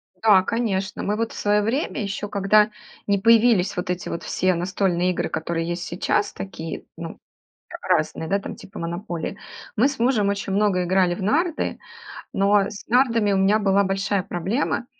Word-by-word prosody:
Да, 205 Hz, -4 st, +5 dB
конечно. 205 Hz, -4 st, -2 dB
Мы 210 Hz, -, 0 dB
вот 225 Hz, +1 st, -2 dB
в -, -, -10 dB
своё 210 Hz, 0 st, +2 dB
время, 245 Hz, +3 st, -1 dB
ещё 200 Hz, 0 st, -4 dB
когда 210 Hz, +1 st, +3 dB, 0.4 s
не 200 Hz, 0 st, +3 dB
появились 225 Hz, -2 st, +4 dB
вот 180 Hz, 0 st, -4 dB
эти 180 Hz, 0 st, -3 dB
вот 170 Hz, -, -5 dB
все 185 Hz, 0 st, +1 dB
настольные 180 Hz, 0 st, 0 dB
игры, -, -, -2 dB
которые 165 Hz, +1 st, -2 dB
есть 175 Hz, +1 st, -3 dB
сейчас, 180 Hz, +3 st, -1 dB
такие, 165 Hz, -4 st, -7 dB
ну, -, -, -7 dB, 0.5 s
а -, -, -9 dB
разные, 160 Hz, -, 0 dB
да, 200 Hz, +1 st, +2 dB
там -, -, -7 dB
типа 195 Hz, -, -11 dB
"Монополии", 170 Hz, +2 st, -4 dB, 0.4 s
мы 250 Hz, +6 st, +4 dB
с 275 Hz, -, -5 dB
мужем 230 Hz, -4 st, +2 dB
очень 200 Hz, -1 st, -2 dB
много 195 Hz, -3 st, +2 dB
играли 180 Hz, -1 st, +2 dB
в 195 Hz, -, -7 dB
нарды, 315 Hz, -, 0 dB, 0.5 s
но 200 Hz, +1 st, +3 dB
с 210 Hz, -, -9 dB
нардами 230 Hz, -4 st, +3 dB
у -, -, +2 dB
меня 200 Hz, +3 st, +4 dB
была 200 Hz, -1 st, +3 dB
большая 195 Hz, 0 st, 0 dB
проблема, 200 Hz, +8 st, -2 dB
200 Hz, 175 wpm, -23 LUFS, 185-215 Hz, 0.5 s, Да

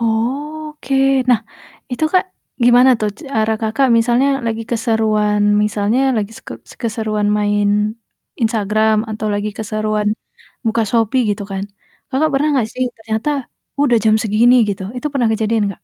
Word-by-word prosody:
Oke, 275 Hz, +5 st, -2 dB, 0.4 s
nah, 230 Hz, -3 st, +4 dB, 0.5 s
itu, 315 Hz, -, -1 dB
Kak, 370 Hz, -, +3 dB, 0.4 s
gimana 245 Hz, +2 st, +6 dB
tuh 215 Hz, -1 st, 0 dB, 0.2 s
cara 220 Hz, -2 st, +1 dB
Kakak 225 Hz, +5 st, +1 dB
misalnya 240 Hz, +4 st, +2 dB, 0.2 s
lagi 225 Hz, 0 st, -2 dB
keseruan 215 Hz, -3 st, +1 dB, 0.2 s
misalnya 210 Hz, +3 st, 0 dB, 0.2 s
lagi 215 Hz, -1 st, -2 dB
s -, -, -16 dB
ke -, -, -6 dB, 0.3 s
keseruan 215 Hz, -2 st, -1 dB
main 205 Hz, 0 st, +1 dB, 0.7 s
Instagram, 220 Hz, 0 st, +2 dB, 0.2 s
atau 215 Hz, 0 st, -4 dB
lagi 205 Hz, +1 st, -2 dB
keseruan 215 Hz, -1 st, -1 dB, 0.6 s
buka 225 Hz, +1 st, +1 dB
Shopee, 230 Hz, +2 st, +2 dB
gitu 205 Hz, 0 st, -2 dB
kan, 195 Hz, 0 st, -3 dB, 0.5 s
Kakak 300 Hz, +3 st, +1 dB
pernah 295 Hz, +3 st, +2 dB
nggak 240 Hz, -5 st, +1 dB
sih, 255 Hz, -, 0 dB
ternyata, 220 Hz, +5 st, -2 dB, 0.5 s
"Udah 245 Hz, -5 st, +4 dB
jam 215 Hz, -1 st, +4 dB
segini," 225 Hz, +3 st, +4 dB
gitu. 195 Hz, -1 st, -3 dB
Itu 250 Hz, -, -4 dB
pernah 245 Hz, -5 st, +1 dB
kejadian, 220 Hz, 0 st, 0 dB
gak? -, -, -16 dB
220 Hz, 145 wpm, -17 LUFS, 215-245 Hz, 0.7 s, gimana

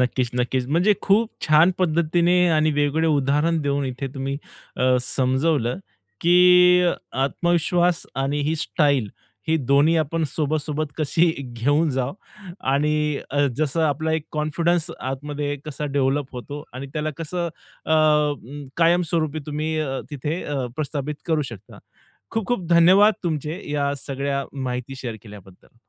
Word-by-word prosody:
नक्कीच, 125 Hz, -1 st, 0 dB
नक्कीच. 125 Hz, +1 st, 0 dB
म्हणजे 175 Hz, +8 st, +3 dB
खूप 215 Hz, +3 st, +3 dB, 0.2 s
छान 155 Hz, +3 st, +6 dB
पद्धतीने 175 Hz, +1 st, +2 dB
आणि 155 Hz, -1 st, +3 dB
वेगवेगळे 145 Hz, +2 st, +1 dB
उदाहरण 150 Hz, +3 st, +1 dB
देऊन 140 Hz, 0 st, 0 dB
इथे 130 Hz, +1 st, -4 dB
तुम्ही 135 Hz, +1 st, -3 dB, 0.4 s
अ, 130 Hz, 0 st, +3 dB
समजवलं, 130 Hz, +2 st, 0 dB, 0.4 s
की 180 Hz, +1 st, +6 dB
अ, 175 Hz, -, +3 dB, 0.3 s
आत्मविश्वास 175 Hz, +4 st, +1 dB
आणि 135 Hz, +2 st, -1 dB
ही 160 Hz, -, +1 dB
स्टाईल 140 Hz, -6 st, +1 dB, 0.4 s
ही 160 Hz, -, +3 dB
दोन्ही 140 Hz, +3 st, +3 dB
आपण 160 Hz, +1 st, 0 dB
सोबत-सोबत 155 Hz, +1 st, -1 dB
कशी 160 Hz, +2 st, +2 dB, 0.2 s
घेऊन 135 Hz, +6 st, 0 dB
जाऊ 130 Hz, 0 st, -1 dB, 0.6 s
आणि 150 Hz, +1 st, +1 dB
अ, 145 Hz, 0 st, +2 dB
जसं 155 Hz, +1 st, 0 dB
आपला 155 Hz, +2 st, -1 dB
एक 160 Hz, -1 st, -2 dB
कॉन्फिडन्स 165 Hz, +3 st, 0 dB
आतमध्ये 145 Hz, +2 st, -3 dB
कसा 150 Hz, -1 st, -5 dB
डेव्हलप 135 Hz, 0 st, +1 dB
होतो 145 Hz, +4 st, -7 dB
आणि 130 Hz, +2 st, -6 dB
त्याला 155 Hz, +1 st, -2 dB
कसं 170 Hz, +2 st, -3 dB, 0.4 s
अ, -, -, -5 dB
अं, 150 Hz, -3 st, +1 dB
कायमस्वरूपी 165 Hz, -2 st, +2 dB
तुम्ही 155 Hz, +1 st, -2 dB
अ, 135 Hz, -3 st, -2 dB
तिथे 150 Hz, +4 st, -3 dB
अ, 140 Hz, -3 st, -2 dB
प्रस्थापित 150 Hz, 0 st, -3 dB
करू 160 Hz, -3 st, +1 dB
शकता. 105 Hz, -2 st, -12 dB, 0.5 s
खूप-खूप 225 Hz, -3 st, -2 dB
धन्यवाद 185 Hz, +5 st, +6 dB
तुमचे 155 Hz, +1 st, -2 dB
या 140 Hz, -1 st, 0 dB
सगळ्या 140 Hz, 0 st, -2 dB
माहिती 130 Hz, -1 st, -4 dB
शेअर 120 Hz, -4 st, -5 dB
केल्याबद्दल. 100 Hz, -1 st, -15 dB
150 Hz, 135 wpm, -23 LUFS, 135-165 Hz, 0.6 s, छान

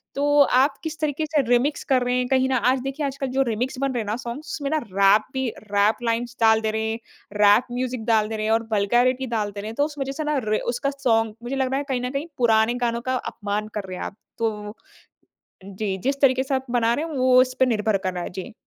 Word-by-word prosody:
तो 290 Hz, +1 st, +3 dB, 0.2 s
आप 275 Hz, +1 st, +2 dB
किस 320 Hz, 0 st, -5 dB
तरीके 305 Hz, 0 st, -1 dB
से 300 Hz, -1 st, +1 dB
रीमिक्स 245 Hz, +5 st, +2 dB
कर 260 Hz, -2 st, +4 dB
रहे 250 Hz, 0 st, 0 dB
हैं 250 Hz, 0 st, 0 dB
कहीं 260 Hz, 0 st, +2 dB
ना 260 Hz, -, +1 dB, 0.2 s
आज 265 Hz, -, 0 dB
देखिए 275 Hz, +2 st, -3 dB
आजकल 275 Hz, 0 st, -3 dB
जो 270 Hz, -, +3 dB
रीमिक्स 240 Hz, +4 st, -2 dB
बन 275 Hz, -1 st, 0 dB
रहे 240 Hz, -, -1 dB
हैं 215 Hz, -, -6 dB
ना 210 Hz, -, -1 dB
सॉन्ग्स 245 Hz, +6 st, -6 dB
उसमें 280 Hz, -2 st, -3 dB
ना 315 Hz, -, +1 dB
रैप 200 Hz, -4 st, +3 dB
भी, 265 Hz, -1 st, -1 dB
रैप 205 Hz, 0 st, 0 dB
लाइन्स 235 Hz, +1 st, -1 dB
डाल 220 Hz, 0 st, +5 dB
दे 220 Hz, 0 st, 0 dB
रहे 220 Hz, 0 st, -2 dB
हैं, 225 Hz, -, -4 dB, 0.3 s
रैप 210 Hz, +3 st, +5 dB
म्यूज़िक 250 Hz, -2 st, -3 dB
डाल 220 Hz, -2 st, +3 dB
दे 220 Hz, -, -3 dB
रहे 215 Hz, -, -2 dB
हैं 220 Hz, -, +1 dB
और 225 Hz, 0 st, 0 dB
वल्गैरिटी 245 Hz, +6 st, +2 dB
डाल 210 Hz, -1 st, -1 dB
दे 200 Hz, 0 st, -7 dB
रहे 210 Hz, -, -6 dB
हैं। 225 Hz, -, -8 dB
तो 285 Hz, -, +2 dB
उस 300 Hz, -1 st, -8 dB
वज़ह 270 Hz, 0 st, -2 dB
से 310 Hz, -, -2 dB
ना 300 Hz, -1 st, 0 dB
र 215 Hz, 0 st, 0 dB
उसका 275 Hz, +4 st, -1 dB
सॉन्ग 225 Hz, -4 st, +1 dB
मुझे 255 Hz, +3 st, -3 dB
लग 265 Hz, -1 st, 0 dB
रहा 270 Hz, -, +1 dB
है 285 Hz, -, -1 dB
कहीं 255 Hz, -2 st, 0 dB
ना 250 Hz, -, -2 dB
कहीं 275 Hz, +4 st, -3 dB
पुराने 225 Hz, -1 st, +3 dB
गानों 235 Hz, 0 st, -1 dB
का -, -, +1 dB, 0.2 s
अपमान 205 Hz, +1 st, -3 dB
कर 210 Hz, -, -2 dB
रहे 185 Hz, -1 st, -6 dB
हैं -, -, -5 dB
आप। -, -, -7 dB, 0.2 s
तो 210 Hz, -2 st, -3 dB, 0.9 s
जी 195 Hz, 0 st, -3 dB
जिस 275 Hz, +1 st, 0 dB
तरीके 260 Hz, -1 st, +4 dB
से 270 Hz, 0 st, -1 dB
आप 265 Hz, -, -2 dB
बना 235 Hz, -1 st, +2 dB
रहे 300 Hz, +6 st, -1 dB
हैं 325 Hz, -, -7 dB
वो 255 Hz, 0 st, +5 dB
इस 255 Hz, 0 st, 0 dB
पर 260 Hz, -, +6 dB
निर्भर 215 Hz, -3 st, +1 dB
कर 185 Hz, -, -1 dB
रहा 180 Hz, -1 st, -4 dB
है। -, -, -5 dB
जी। 185 Hz, +2 st, -8 dB
245 Hz, 265 wpm, -23 LUFS, 215-270 Hz, 0.9 s, पर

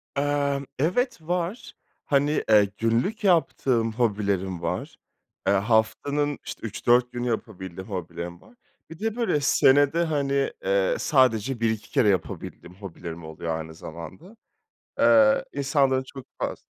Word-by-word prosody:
Emm, 140 Hz, -1 st, 0 dB
evet, 230 Hz, -, 0 dB
var. 175 Hz, +7 st, -3 dB, 0.3 s
Hani, 145 Hz, +1 st, +1 dB
eee, 105 Hz, -2 st, +6 dB
günlük 120 Hz, -, 0 dB
yaptığım 130 Hz, -, +2 dB
hobilerim 100 Hz, -6 st, -1 dB
var. 85 Hz, -, -3 dB, 0.5 s
Eee, 100 Hz, -, +4 dB
haftanın, 115 Hz, +8 st, +1 dB
işte, 115 Hz, -, -6 dB
3-4 120 Hz, +3 st, +2 dB
günü 120 Hz, 0 st, -3 dB
yapabildiğim 95 Hz, -5 st, -5 dB
hobilerim 85 Hz, -2 st, -6 dB
var. -, -, -20 dB, 0.3 s
Bir 165 Hz, -, -11 dB
de, 225 Hz, +1 st, -2 dB
böyle, 230 Hz, -11 st, +1 dB
senede, 145 Hz, +3 st, +4 dB
hani, 140 Hz, -3 st, 0 dB
eee, 95 Hz, 0 st, +2 dB
sadece 130 Hz, -3 st, +2 dB
1-2 110 Hz, -2 st, -1 dB
kere 105 Hz, -, +3 dB
yapabildiğim 90 Hz, 0 st, -3 dB
hobilerim 85 Hz, -4 st, -8 dB
oluyor 80 Hz, +1 st, -4 dB
aynı 80 Hz, 0 st, -7 dB
zamanda. 85 Hz, -, -10 dB, 0.6 s
Eee, 275 Hz, -1 st, +5 dB
insanların 135 Hz, -2 st, +1 dB
çok 130 Hz, 0 st, -11 dB
faz -, -, -4 dB
125 Hz, 125 wpm, -25 LUFS, 100-145 Hz, 0.6 s, eee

